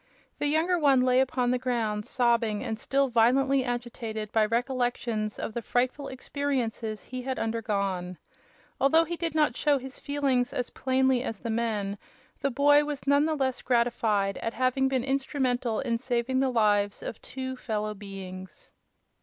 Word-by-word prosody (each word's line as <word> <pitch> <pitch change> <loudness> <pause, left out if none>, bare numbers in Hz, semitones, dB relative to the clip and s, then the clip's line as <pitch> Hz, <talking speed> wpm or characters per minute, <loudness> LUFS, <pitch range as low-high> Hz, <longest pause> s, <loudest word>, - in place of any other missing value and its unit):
The 290 - +1
younger 330 +4 +2
one 275 -4 +4
lay 255 0 +4
upon 250 -2 +1
the 250 - +1
ground 225 -4 -1
sobbing 235 -3 +1
and 225 -3 -3
still 275 +3 +1
violently 260 +3 +3
agitated 235 -3 -4
by 220 -2 +3
recollections 240 -2 -1
of - - -4
the 235 - -3
frightful 255 +5 -1
experiences 255 -5 -3
he 255 0 -6
had 260 +1 -3
undergone. 200 -5 -2 0.6
Although 320 +4 +5
he 340 +1 -4
did 330 -2 -3
not 300 -6 +3
show 290 +1 +2
his 265 0 -8
feelings 275 -4 0
as 250 - -2
plainly 260 -1 +2
as 225 - -4
the 230 - -3
men, 210 -3 -1 0.4
the 275 - 0
boy 290 +3 +5
was 295 -2 -5
none 285 +2 +4
the 315 - 0
less 260 -3 -1
gratified 230 -5 +1
at 230 - -3
having 255 +2 +2
been 260 -2 0
instrumental 265 -3 0
in 230 -1 -1
saving 250 +1 0
the 265 0 +2
lives 205 -4 +2
of - - -6
two 260 0 -5
fellow 215 -4 -3
beings. 190 -2 -9
245 Hz, 160 wpm, -28 LUFS, 225-270 Hz, 0.6 s, Although